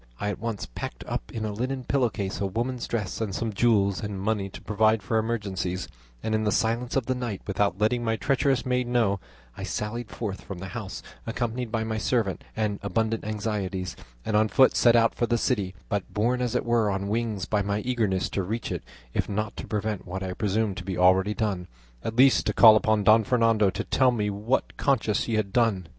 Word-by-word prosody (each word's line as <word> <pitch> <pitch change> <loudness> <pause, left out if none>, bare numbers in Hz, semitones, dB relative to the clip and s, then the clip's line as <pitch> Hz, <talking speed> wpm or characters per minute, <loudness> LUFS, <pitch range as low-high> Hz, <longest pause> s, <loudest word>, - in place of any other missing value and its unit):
I 105 - -1
at 105 - -4
once 115 -2 -3
packed - - -6
up - - -4
in 110 -1 -3
a 105 - -2
linen 130 +4 -3
pillow 130 -2 +2
case 100 -2 -4
a 100 - +1
woman's 120 +5 -2
dress, 110 -2 -3
and 100 -4 -2
some 115 -2 -2
jewels 100 -3 +2
and 105 -2 -4
money 100 0 -1
to - - -10
provide 110 0 +2
for 110 +3 +1
emergencies, 100 -5 -2 0.4
and 110 - -1
in 110 0 +1
the 105 - +1
silence 115 +3 0
of 135 -4 +1
the 130 - 0
night, 120 -6 -4
without 100 -2 0
letting 120 +3 +2
my 115 -1 +1
treacherous 135 +4 +1
maid 125 -1 0
know, 115 -5 +2 0.4
I - - -8
sallied 110 +2 -3
forth 105 -4 -5
from 95 - -7
the 95 +1 -7
house, - - -6 0.2
accompanied 120 0 -2
by 110 -1 0
my 110 0 -2
servant 110 -4 0
and 105 -2 -1
abundant 110 +3 -1
anxieties, 105 -4 -3 0.3
and 110 - -1
on 110 +1 +4
foot 130 +4 +4
set 120 -1 +5
out 115 -1 +4
for 120 - 0
the 120 +1 +2
city, 100 -7 0
but 100 -3 -2
borne 120 +4 +1
as 125 -1 -1
it - - 0
were 120 -3 +2
on 100 0 -2
wings 110 -3 -1
by 105 -1 +1
my 100 +1 -1
eagerness 110 -7 0
to 100 - 0
reach 110 +5 -3
it, - - -3 0.3
if - - -1
not 105 +1 -2
to - - -6
prevent 105 -3 -2
what 95 +2 -4
I 95 -1 -3
presumed 105 -1 0
to 95 - -5
be 95 0 -4
already 95 +3 +4
done, 100 -6 -2 0.4
at 115 - -3
least 130 +2 +5
to - - +1
call 110 -2 +9
upon 110 -1 +2
Don 110 +2 +6
Fernando 115 -3 +3
to - - -3
tell 130 -1 +3
me 105 -4 0
with 100 +1 -7
what 130 +3 0
conscience 110 -6 +1
he 115 - -1
had 100 -3 -1
done 115 -6 +2
it. - - -18
110 Hz, 225 wpm, -26 LUFS, 100-115 Hz, 0.4 s, call